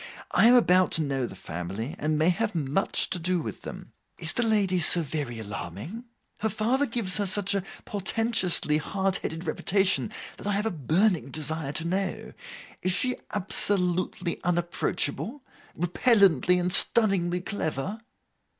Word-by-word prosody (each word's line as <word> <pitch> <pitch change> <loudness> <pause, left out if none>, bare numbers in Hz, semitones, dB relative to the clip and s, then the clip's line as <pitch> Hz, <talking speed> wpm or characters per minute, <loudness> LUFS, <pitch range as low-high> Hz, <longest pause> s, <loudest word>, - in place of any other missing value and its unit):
I 225 - +5
am 245 - +7
about 185 -5 +5
to 160 - +1
know 135 -4 -1
the - - -10
family, 95 - -5
and 155 +1 0
may 160 +3 +3
have 210 +3 -1
much 150 +4 0
to 180 - -1
do 180 +1 0
with - - -6
them. - - -9 0.2
Is - - +1
the 245 - 0
lady 205 -5 +2
so 170 0 +3
very 140 -5 -4
alarming? 105 - -7 0.3
Her 220 - +1
father 245 +8 +1
gives 225 -6 0
her 205 -1 0
such 200 +1 0
a 200 - +1 0.2
portentously 195 -6 +1
hard 190 +4 -1
headed 165 +2 -5
reputation, 195 +5 +1 0.3
that - - -7
I 205 - +1
have 205 +2 0
a 225 - +1
burning 170 - +1
desire 155 0 -2
to 165 - 0
know. 190 +2 -3 0.5
Is 185 - +1
she 250 +6 0 0.2
absolutely 185 -3 0
unapproachable? 175 - -2 0.3
Repellently 180 - +4
and 180 0 -1
stunningly 195 -5 +3
clever? 190 +1 -3
180 Hz, 150 wpm, -27 LUFS, 160-205 Hz, 0.5 s, am